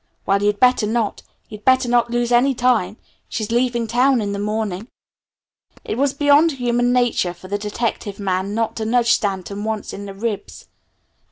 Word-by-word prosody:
Well 200 0 +2
you'd 205 0 +1
better 250 -4 +4
not. 225 -1 -1 0.3
You'd 210 -1 -11
better 260 -1 +3
not 240 0 +2
lose 240 0 -1
any 255 +3 +3
time. 230 -5 +1 0.3
She's 215 -1 -4
leaving 240 -1 +1
town 250 +3 +2
in 205 -2 -2
the 200 - -3
morning." 210 -1 -3 1.0
It - - -3
was 275 +3 +1
beyond 290 +3 +4
human 245 -1 0
nature 245 -8 +1
for 180 +2 -13
the 205 +2 -2
detective 210 -1 -3
man 195 0 -2
not 225 -1 -1
to 220 - -3
nudge 235 +1 +2
Stanton 200 0 -1
once 220 -1 -4
in 200 +1 -7
the 195 - -8
ribs. 215 0 -5
225 Hz, 175 wpm, -20 LUFS, 205-245 Hz, 1.0 s, better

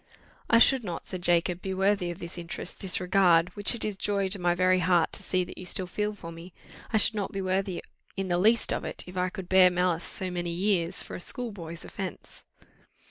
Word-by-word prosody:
"I 230 - +6
should 255 +1 +5
not," 175 -5 -5
said 185 -2 -5
Jacob, 175 +1 +2
"be 190 -1 -3
worthy 195 -1 +1
of 175 - -5
this 175 -1 -7
interest 170 +1 -6
this 190 -2 +2
regard, 180 -2 +4
which 205 +3 +1
it 235 - -2
is 210 -2 -3
joy 200 -1 0
to 195 -1 -1
my 175 0 +2
very 185 +1 +3
heart 175 -2 +2
to - - -3
see 185 -1 0
that 175 - -10
you 185 - -8
still 185 +1 -1
feel 210 +4 -2
for 170 -4 -9
me 165 +2 -11 0.4
I 220 - +3
should 215 - +3
not 205 -2 -3
be 195 - -4
worthy 190 -1 -1 0.3
in 195 0 -2
the 175 -1 +1
least 220 +4 +4
of - - -3
it, - - -5
if 180 - -11
I 180 0 0
could 190 -1 -8
bear 190 0 +6
malice 180 -1 0
so 185 -2 -2
many 175 -1 -3
years 175 -1 0
for - - -8
a - - -6
schoolboy's 175 -8 -4
offence. 190 -2 -8
185 Hz, 230 wpm, -28 LUFS, 175-195 Hz, 0.4 s, I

